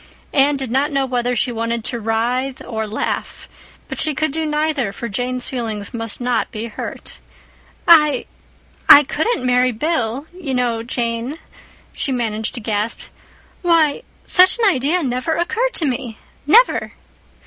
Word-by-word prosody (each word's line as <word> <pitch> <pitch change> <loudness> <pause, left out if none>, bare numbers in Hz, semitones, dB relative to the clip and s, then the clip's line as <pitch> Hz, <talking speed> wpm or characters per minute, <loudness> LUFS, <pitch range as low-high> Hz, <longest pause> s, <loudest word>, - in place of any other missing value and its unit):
Anne 280 +1 +3
did 265 -4 -5
not 275 +4 +1
know 275 -1 +1
whether 245 -1 -1
she 245 +2 0
wanted 230 0 -2
to 240 +1 -1
writhe 240 +4 -1
or 220 -2 -4
laugh; 210 - -4 0.4
but - - -6
she 310 -2 +3
could 310 0 0
do 315 +1 -2
neither, 300 -7 0
for 235 +4 -6
Jane's 245 +4 -2
feelings 220 -5 -4
must 225 -2 -1
not 245 -2 0
be 215 +1 -5
hurt. 230 - -8 0.7
"I—I 300 -2 +4
couldn't 310 - -1
marry 250 0 +3
Bill, 250 0 -2
you 325 -8 -4
know, 240 -2 0
Jane," 235 +3 -3 0.6
she 275 - -2
managed 225 -2 -2
to - - -4
gasp. 215 0 -2 0.6
"Why, 330 -1 +2 0.2
such 370 +4 +5
an 465 - +1
idea 305 +7 0
never 255 +5 -1
occurred 465 +9 -1
to 325 - +2
me—never!" 270 - +1
255 Hz, 145 wpm, -19 LUFS, 230-300 Hz, 0.7 s, such